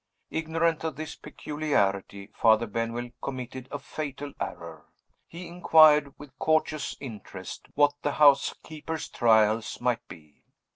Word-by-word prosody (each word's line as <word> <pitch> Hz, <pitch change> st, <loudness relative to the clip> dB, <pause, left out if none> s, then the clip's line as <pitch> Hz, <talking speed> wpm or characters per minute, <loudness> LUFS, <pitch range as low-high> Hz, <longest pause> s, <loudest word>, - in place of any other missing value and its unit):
Ignorant 160 Hz, 0 st, 0 dB
of 160 Hz, -, -3 dB
this 155 Hz, +1 st, -6 dB
peculiarity, 100 Hz, -10 st, -2 dB
Father 110 Hz, 0 st, +4 dB
Benwell 115 Hz, +2 st, -3 dB
committed 130 Hz, -1 st, -6 dB
a 145 Hz, -, -3 dB
fatal 145 Hz, -1 st, -6 dB
error. -, -, -7 dB, 0.4 s
He 175 Hz, +2 st, -9 dB
inquired, 155 Hz, -4 st, +5 dB
with 145 Hz, -2 st, -14 dB
courteous 155 Hz, -1 st, 0 dB
interest, 115 Hz, -7 st, -9 dB
what 145 Hz, 0 st, +4 dB
the 145 Hz, -, -1 dB
housekeeper's 150 Hz, +2 st, +2 dB
"trials" 110 Hz, -1 st, +2 dB
might 120 Hz, -1 st, -1 dB
be. 75 Hz, -4 st, -15 dB
140 Hz, 115 wpm, -27 LUFS, 115-155 Hz, 0.4 s, inquired